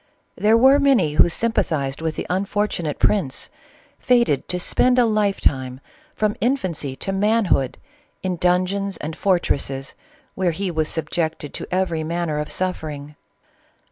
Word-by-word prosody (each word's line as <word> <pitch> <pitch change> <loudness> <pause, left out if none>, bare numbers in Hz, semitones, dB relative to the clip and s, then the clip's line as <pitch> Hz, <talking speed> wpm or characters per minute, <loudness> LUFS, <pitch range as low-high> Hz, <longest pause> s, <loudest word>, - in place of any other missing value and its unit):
There 215 +2 +4
were 265 +4 +6
many 250 - +3
who 155 - +5
sympathized 155 -10 -1
with 160 -1 -2
the - - -4
unfortunate 190 -4 -1
prince, 180 -11 0 0.5
fated 235 - +2
to 180 - -2
spend 250 +7 +2
a 245 - +5
life 210 -3 +1
time, 130 -2 0 0.4
from 210 -1 0
infancy 185 - -1
to 195 - -4
man 210 +3 +2
hood, 135 -2 -1 0.5
in 185 -2 -1
dungeons 185 +2 0
and 155 +1 -5
fortresses 140 -8 -1 0.4
where 180 -3 0
he 195 -2 -2
was 155 -2 0
subject 160 -1 -2
ed 145 - -8
to - - -4
every 180 -3 0
manner 165 -1 -2
of 150 - -4
suffering. 155 -5 -4
180 Hz, 145 wpm, -22 LUFS, 155-205 Hz, 0.5 s, were